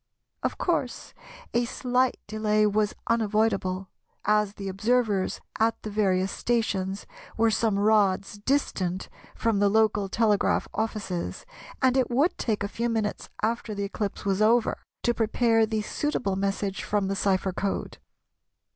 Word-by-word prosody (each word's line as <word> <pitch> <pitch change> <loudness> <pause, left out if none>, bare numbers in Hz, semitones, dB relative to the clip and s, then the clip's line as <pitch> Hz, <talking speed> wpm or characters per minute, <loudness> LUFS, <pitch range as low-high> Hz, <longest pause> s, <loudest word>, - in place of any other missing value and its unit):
Of - - -2
course - - -2 0.4
a 240 +1 +2
slight 250 +1 +1
delay 215 0 +1
was 210 0 +1
unavoidable, 210 -4 +1 0.4
as 210 -1 +2
the 195 - -6
observers 205 0 +1 0.2
at 225 +1 +2
the 215 - -5
various 190 -2 +1
stations 200 -5 -1 0.3
were 225 0 +4
some 215 -1 +1
rods 205 -1 +2
distant 195 -7 -1 0.3
from 225 -3 +1
the 205 0 +4
local 210 -2 +2
telegraph 215 -1 +2
offices, 210 - -3 0.4
and 260 -1 +4
it 260 -2 +2
would 275 +8 +2
take 215 -4 -1
a - - 0
few 235 +3 -2
minutes 220 -2 -2
after 225 -1 -1
the 200 - -2
eclipse 200 0 -4
was 195 0 +1
over 230 +2 +3 0.2
to 240 - +3
prepare 225 0 +2
the 215 -1 -1
suitable 230 -5 -1
message 195 0 -2
from 205 -2 0
the 195 - -1
cypher 190 -1 +1
code. 195 +2 -3
210 Hz, 140 wpm, -27 LUFS, 195-230 Hz, 0.4 s, were